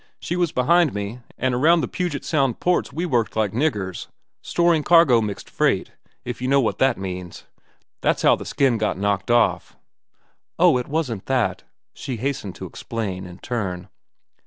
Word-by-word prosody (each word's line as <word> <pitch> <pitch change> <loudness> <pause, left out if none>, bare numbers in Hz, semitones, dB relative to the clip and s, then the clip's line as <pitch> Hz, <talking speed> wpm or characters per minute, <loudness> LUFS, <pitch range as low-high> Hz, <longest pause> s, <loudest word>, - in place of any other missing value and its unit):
She 175 - -3
was 175 -3 +1
behind 160 +2 +3
time, 105 +4 -5
an' 130 0 0
around 160 +7 +4
the - - -2
Puget 175 -6 -3
Sound 135 -7 +1
ports 180 -4 +1
we 165 +6 -3
worked 120 -9 0
like 110 -3 +1
niggers, 110 - -2 0.3
storing 170 -2 +2
cargo—mixed 125 - +3
freight, - - 0 0.3
if 125 0 -5
you 130 - -1
know 140 +1 +4
what 120 - 0
that 135 -2 +3
means. 90 -2 -7 0.6
That's - - +1
how - - +6
the - - -8
skin 135 -5 +1
got 105 -3 0
knocked 100 +2 -1
off." 120 0 +2 0.8
"Oh, 125 - +5
it 125 - -5
wasn't 140 -10 -3
that," 130 -3 0 0.3
she 130 -3 -5
hastened 125 -5 -3
to - - -7
explain, 95 -5 -5
in 90 0 -11
turn. 95 -7 -4
125 Hz, 165 wpm, -22 LUFS, 105-145 Hz, 0.8 s, how